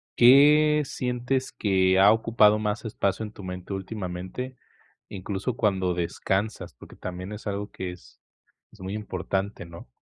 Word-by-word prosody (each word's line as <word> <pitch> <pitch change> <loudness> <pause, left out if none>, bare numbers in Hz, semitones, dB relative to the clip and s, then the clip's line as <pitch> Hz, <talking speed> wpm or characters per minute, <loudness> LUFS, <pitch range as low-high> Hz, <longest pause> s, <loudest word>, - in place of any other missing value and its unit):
¿qué 150 +4 +6
sientes 125 +1 -2
que 95 -2 +2
ha 100 +2 +7
ocupado 110 -2 +4
más 110 +1 -2
espacio 105 0 -1
en 105 - -10
tu 100 - -11
mente 90 +1 -6
últimamente? 95 +5 -5 0.5
Incluso 100 +5 -4
cuando 95 -3 +1
descansas, 95 +4 -2
porque - - -15
también 90 +2 -7
es 105 +1 -8
algo 100 0 -3
que 95 -1 -5
es 85 -10 -15 0.5
es - - -20
muy 95 +2 -5
importante, 95 -1 -3
¿no? 85 -5 -12
100 Hz, 145 wpm, -26 LUFS, 95-115 Hz, 0.5 s, ha